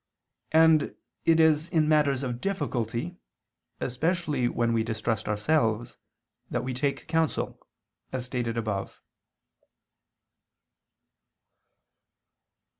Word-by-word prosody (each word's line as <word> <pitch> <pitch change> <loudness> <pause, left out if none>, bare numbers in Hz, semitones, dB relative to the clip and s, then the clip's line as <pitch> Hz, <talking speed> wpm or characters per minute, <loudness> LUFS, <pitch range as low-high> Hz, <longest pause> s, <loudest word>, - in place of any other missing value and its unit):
And 160 -1 +5 0.3
it 165 0 +5
is 160 0 +4
in 160 -3 +2
matters 145 -3 +3
of 120 -2 -3
difficulty, 150 - -2 0.6
especially 150 -1 0
when 115 -1 0
we 115 - +2
distrust 110 -1 -2
ourselves, 110 +1 0 0.5
that - - -1
we 130 0 -3
take 140 +2 -2
counsel, 160 -1 0 0.5
as 130 -1 -3
stated 120 -2 -2
above. 105 -4 -3
130 Hz, 90 wpm, -27 LUFS, 115-160 Hz, 0.6 s, And